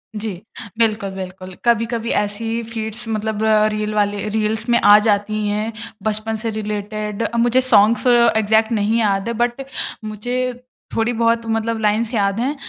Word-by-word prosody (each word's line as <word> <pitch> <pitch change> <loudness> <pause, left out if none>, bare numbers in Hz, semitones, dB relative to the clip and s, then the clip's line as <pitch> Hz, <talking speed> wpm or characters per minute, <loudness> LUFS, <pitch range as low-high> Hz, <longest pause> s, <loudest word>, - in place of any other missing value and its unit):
जी। 210 0 -3 0.5
बिल्कुल, 215 -3 +1
बिल्कुल। 185 -1 -8
कभी-कभी 230 0 +1
ऐसी 205 +2 -5
ही 230 +1 -1
फीड्स 220 0 -4
मतलब 215 -1 -2 0.3
रील 215 0 -2
वाले 205 0 0
रील्स 220 +1 -1
में 235 0 +4
आ 205 0 +7
जाती 210 +1 0
हैं 210 +2 -1 0.3
बचपन 220 +1 -1
से 225 - -1
रिलेटेड। 210 0 -4
अ, 235 - -2
मुझे 240 +2 +3
सॉन्ग्स 235 0 +4
इग्ज़ैक्ट 220 -2 +4
नहीं 220 +1 +1
याद 200 -1 +1
है 235 - -1
बट 240 +2 -2 0.4
मुझे 245 +4 -3 0.3
थोड़ी 225 +2 +1
बहुत 230 0 +2
मतलब 225 0 -1
लाइन्स 215 +3 +1
याद 200 -1 +1
हैं 270 +5 -1
220 Hz, 155 wpm, -19 LUFS, 210-230 Hz, 0.5 s, आ